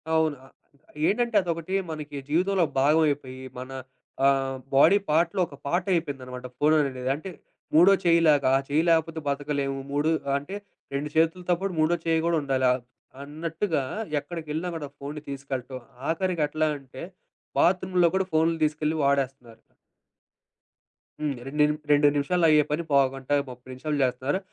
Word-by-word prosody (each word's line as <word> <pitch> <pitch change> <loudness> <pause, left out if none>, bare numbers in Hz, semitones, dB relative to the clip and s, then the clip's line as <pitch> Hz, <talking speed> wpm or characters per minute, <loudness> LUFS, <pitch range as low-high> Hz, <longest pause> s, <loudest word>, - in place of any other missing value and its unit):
అవును. 160 -2 +2
ఆ! - - -16 0.6
ఏంటంటే, 235 +1 0
అదొకటి 170 +1 -3 0.2
మనకి 150 -2 -6
జీవితంలో 180 +3 +2 0.2
భాగం 150 +4 +4
అయిపోయి 130 -2 -5 0.2
మన 130 +1 -8 0.5
ఆహ్, 135 -1 +2 0.2
బాడీ 160 +8 +7
పార్ట్‌లో 165 +4 +2
ఒక 140 - -12
పార్ట్ 175 +5 0
అయిపోయిందనమాట 130 -6 -3
ఫోను 150 +3 +3
అనేనేది. 130 -2 -3
అంటే 160 +6 -7 0.5
మూడో 175 +5 +7
చెయ్యిలాగా 160 -5 +4
ఆ - - +1
చెయ్యి 150 +3 +2
లేకపోతే 165 0 +2
బతకలేము. 140 -1 -1
మూడు 145 +2 +1 0.3
అంటే 145 +8 -7 0.4
2 140 +2 -2
చేతులతో 170 +3 +2
పాటు 195 -2 -2
మూడో 155 +2 +3
చెయ్యి 165 -1 +2
కూడా 170 -1 +2
ఉండాలి. 135 -2 0
ఆ! - - +4 0.5
అన్నట్టుగా 160 +2 -2 0.4
ఎక్కడికెళ్ళినా 160 +1 -5
కూడా 145 -3 -6
ఫోనుని 145 +2 -7
తీసుకెళ్ళటం. 135 -2 -5 0.3
ఆఖరికి 170 -1 0
ఎట్లా 155 +1 0
అంటే 130 -1 -11 0.6
బాత్రూమ్‌లో 180 -1 +3
కూడా 190 0 +1
ఫోనులు 165 +1 +2
తీసుకెళ్ళి 155 +1 0
వాడేస్తున్నారు. 135 -4 -1 1.6
హ్మ్. 145 -3 -1
రెండు 135 +2 -7
ని - - +7 0.3
2 145 0 +5
నిముషాలు 165 +5 +1
అయ్యే 150 -1 +5
పని 155 +3 0
పావుగంట, 135 -1 +1 0.2
30 125 +1 -12
నిముషాలు 145 +4 -3
చేస్తున్నారు. 130 +7 0
150 Hz, 140 wpm, -26 LUFS, 140-165 Hz, 1.6 s, బాడీ